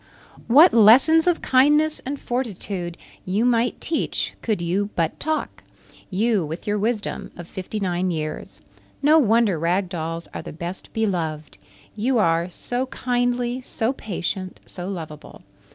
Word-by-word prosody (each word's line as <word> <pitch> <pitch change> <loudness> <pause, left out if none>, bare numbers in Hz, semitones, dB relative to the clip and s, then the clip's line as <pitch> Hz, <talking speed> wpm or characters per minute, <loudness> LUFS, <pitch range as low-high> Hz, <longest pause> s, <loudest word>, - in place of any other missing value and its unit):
What 300 +9 +7
lessons 260 - +6
of 350 -2 +2
kindness 295 +4 +4
and 280 +1 -3
fortitude 200 -8 -4 0.3
you 200 +5 0
might 240 0 +2
teach 325 - -2
could 215 -4 -1
you 185 +4 -1
but 165 -2 -1
talk; 315 0 -3 0.5
you 210 0 +1
with 160 +3 -6
your 210 0 0
wisdom 215 0 -2
of 175 -1 -8
fifty 190 +3 -5
nine 185 -1 0
years. 155 -3 -5 0.4
No 310 +3 +6
wonder 225 - +3
Rag 175 +3 0
Dolls 165 -1 -4
are - - -5
the - - -9
best 170 +4 -7
beloved! 165 - -2 0.4
You 240 +4 +1
are 170 -3 +2
so 245 +8 -3
kindly, 245 0 -1
so 245 0 -2
patient, 185 -4 -4
so 180 0 -7
lovable. 155 -5 -8
210 Hz, 140 wpm, -23 LUFS, 175-245 Hz, 0.5 s, What